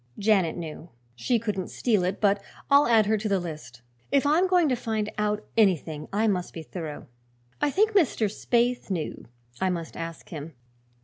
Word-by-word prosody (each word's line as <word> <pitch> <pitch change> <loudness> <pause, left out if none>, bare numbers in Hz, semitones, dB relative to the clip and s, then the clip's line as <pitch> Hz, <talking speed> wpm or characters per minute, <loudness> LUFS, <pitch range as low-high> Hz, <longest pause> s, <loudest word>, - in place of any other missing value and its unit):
Janet 195 -6 +2
knew; 165 0 -7 0.3
she 235 - +1
couldn't 210 -5 -3
steal 215 -7 +1
it 185 +2 -1
but 200 -1 +2 0.3
I'll 280 +1 +6
add 225 -3 +5
her 215 +1 +1
to 215 +1 -2
the 195 -1 +2
list. 150 -8 -8 0.3
If 280 0 +3
I'm 320 +6 +4
going 360 -3 +4
to 255 - +2
find 220 -3 -2
out 210 0 0
anything 165 -8 +2
I 215 +3 +1
must 185 -4 -1
be 165 - -6
thorough. 155 -2 -7 0.6
I 295 - +3
think 425 +9 +2
Mr. 335 - +2
Spaythe 240 +4 0
knew. 175 -5 -4 0.3
I 190 - +1
must 170 -3 -4
ask 165 -1 -7
him. 160 0 -7
205 Hz, 180 wpm, -26 LUFS, 170-235 Hz, 0.6 s, I'll